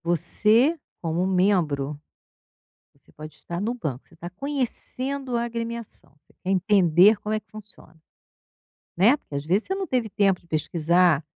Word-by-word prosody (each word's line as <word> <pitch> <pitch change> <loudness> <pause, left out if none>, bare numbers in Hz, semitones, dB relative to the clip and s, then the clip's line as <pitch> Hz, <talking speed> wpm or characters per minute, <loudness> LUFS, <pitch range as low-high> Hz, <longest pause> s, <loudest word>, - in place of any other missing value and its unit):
Você 215 - +3 0.2
como 170 +2 -1
membro, 165 -7 +1 1.0
você - - -27
pode 155 0 -11
estar 170 0 -6
no 225 +4 -1
banco, 145 - -5
você - - -21
está 170 +1 -8
conhecendo 265 +2 -4
a 235 - 0
agremiação, 230 -8 -6
você 150 - -30
quer 185 - -3
entender 190 0 +4
como 210 +1 -5
é 215 - +1
que - - -47
funciona, 210 -6 -14 1.0
né, 225 - +5
porque 275 - -18
às 140 - -3
vezes 190 +7 +1
você 380 - -2
não 390 0 -3
teve 245 -4 -1
tempo 195 -2 +1
de - - -27
pesquisar, 165 0 +2
195 Hz, 160 wpm, -24 LUFS, 165-235 Hz, 1.0 s, né